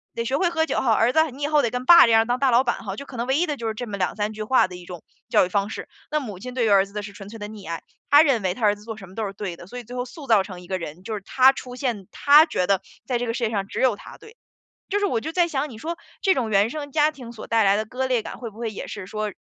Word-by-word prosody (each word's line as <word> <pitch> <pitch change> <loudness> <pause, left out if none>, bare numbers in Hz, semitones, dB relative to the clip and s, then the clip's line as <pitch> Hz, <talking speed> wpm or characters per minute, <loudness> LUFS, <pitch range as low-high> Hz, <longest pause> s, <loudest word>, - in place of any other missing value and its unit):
得 230 - -1
学 260 +4 0
会 350 +3 +2
喝 320 -2 +1
酒 - - -1
吼， 240 - +1
儿 225 +3 +3
子 315 +3 +3
你 275 +3 -8
以 - - +1
后 300 -1 +3
得 235 - 0
跟 250 +2 -4
爸 340 +4 +9
这 230 - +2
样 225 0 +5
当 245 +1 0
大 270 0 +3
老 240 +2 +5
板 235 -2 -2
吼。” - - -4
就 280 - -8
可 265 - -10
能 235 +1 -2
唯 265 +1 +2
一 345 - +2
的 295 -4 -3
就 230 - -4
是 220 - -1
这 230 +3 -5
么 205 -2 -5
2-3 205 +3 -1
句 215 0 -8
话 255 0 +3
的 180 - -9
一 180 - -12
种 175 -2 -9 0.3
教 - - +4
育 - - -7
方 200 +1 0
式。 - - -7 0.2
那 305 - +1
母 210 -8 -7
亲 250 +5 -7
对 250 -1 0
于 - - +2
儿 195 -1 +5
子 200 - -18
的 210 0 -4
是 200 - -8
纯 195 -1 -11
粹 225 +2 -9
的 205 0 -6
溺 210 -4 -10
爱， 165 - -4 0.3
她 290 +1 +8
认 270 -7 +2
为 185 -2 0
她 235 - -12
儿 205 -1 +4
子 205 - -16
做 225 0 -6
什 195 -4 -12
么 185 - -15
都 225 - -2
是 195 - -5
对 190 -3 -5
的， 175 - -12
所 245 - -9
以 245 - -6
最 245 +2 -10
后 250 - -2
塑 280 +2 -11
造 220 -5 +5
成 185 -2 -9
一 180 - -14
个 190 - -2
人， 170 0 -8
就 225 +2 -5
是 210 - -4
他 260 0 +5
出 250 -2 -8
现 240 -8 -3
他 295 +2 +6
觉 180 - -1
得 195 -1 +2 0.2
在 250 - 0
这 245 - -2
个 230 - -1
世 240 - -3
界 225 - +2
上 200 -3 -2
只 - - -4
有 255 -5 +3
他 - - -12
对。 445 +2 -16 0.5
就 405 - +1
是 410 - +1
我 240 - 0
就 315 +8 -5
在 345 0 +2
想， 290 -2 -2
你 225 - -10
说， 330 +8 -4 0.2
这 380 - +3
种 235 -4 -1
原 200 +1 +3
生 285 +2 -6
家 300 0 +3
庭 250 -6 -11
所 225 - -9
带 225 -1 +2
来 195 0 +4
的 215 - -2
割 255 +3 -2
裂 250 -3 +1
感， - - -8
会 235 -3 -6
不 215 - -17
会 230 -1 -3
也 210 - -7
是 205 -3 -7
说， 215 +1 -4
230 Hz, 375 characters per minute, -23 LUFS, 205-270 Hz, 0.5 s, 爸